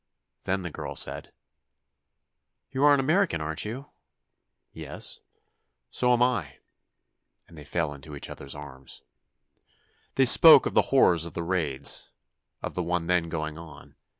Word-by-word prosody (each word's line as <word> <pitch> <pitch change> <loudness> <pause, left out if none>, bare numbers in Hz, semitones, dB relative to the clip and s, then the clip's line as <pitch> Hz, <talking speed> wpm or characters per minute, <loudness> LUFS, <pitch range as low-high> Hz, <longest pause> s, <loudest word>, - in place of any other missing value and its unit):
Then 95 0 -2
the 90 - -6
girl - - -7
said: - - -2 1.4
"You 135 +1 -2
are 145 - +6
an - - -1
American, 160 - +1
aren't 80 +3 -4
you?" 130 +7 -8 0.8
"Yes." - - -3 0.7
"So 125 0 +1
am 120 0 +3
I," 95 - -2 0.9
and 85 - -17
they 75 - -11
fell 80 0 -3
into 75 +1 -11
each 70 - -8
other's 70 0 -9
arms. 70 -3 -11 1.1
They - - +4
spoke - - +8
of - - -3
the - - +5
horrors 85 -2 +3
of 85 - -9
the 85 - -4
raids—of 80 -6 -3
the 90 - -3
one 85 0 -2
then 85 -1 0
going 80 -1 -5
on. 80 -3 -14
85 Hz, 145 wpm, -26 LUFS, 75-100 Hz, 1.4 s, spoke